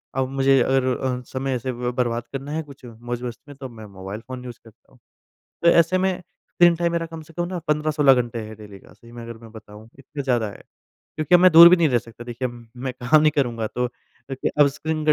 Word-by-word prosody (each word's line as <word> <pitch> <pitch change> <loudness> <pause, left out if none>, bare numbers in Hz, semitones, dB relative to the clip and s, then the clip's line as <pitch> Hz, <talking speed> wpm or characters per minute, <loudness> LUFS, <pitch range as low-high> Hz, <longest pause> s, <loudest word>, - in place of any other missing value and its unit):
अब 130 -1 0
मुझे 135 0 +3
अगर 135 +1 +2
अ, 125 -1 -3
समय 135 0 -3
ऐसे 125 +1 -3
ब 125 0 -3
बर्बाद 120 -2 0
करना 135 +1 -5
है 160 +1 -2
कुछ 140 -3 -15
मौज-मस्ती 120 +3 -7
में - - -11
तब 130 -2 -7
मैं 110 -2 -11
मोबाइल 100 +1 -8
फ़ोन 130 -1 -7
यूज़ 120 -2 -9
करता 115 -2 -21
हूँ, - - -23 0.6
तो 170 - +6
ऐसे 170 +2 +4
में 185 0 0 0.3
स्क्रीन 175 -1 +5
टाइम 170 0 0
मेरा 170 0 -1
कम 165 -1 -9
से 155 +1 -16
कम 175 +1 -2
15-16 150 -2 +3
घंटे 120 -1 -6
है 110 - -10
डेली 105 -2 -13
का - - -19
सही 115 - -18
में 120 0 -10
अगर 115 0 -9
मैं 115 -1 -13
बताऊँ 110 -1 -13
इतना 140 +2 -7
ज़्यादा 120 -4 0
है। - - -14 0.6
क्योंकि 155 +3 +1
अब 175 - +7
मैं 185 0 +7
दूर 170 +1 +11
भी 180 - +6
नहीं 165 -3 +3
रह 125 -3 +2
सकता 115 0 -12
देखिए 120 +1 -4
अम, 120 -1 -13
मैं 130 +1 -4
काम 150 +5 +5
नहीं 155 -1 +4
करूँगा 120 -5 0
तो 125 +3 -2
अ, - - -9 0.4
क 135 - -2
अब 145 - +7
स्क्रीन 155 +2 -4
का 155 - +6
130 Hz, 245 wpm, -22 LUFS, 120-155 Hz, 0.6 s, दूर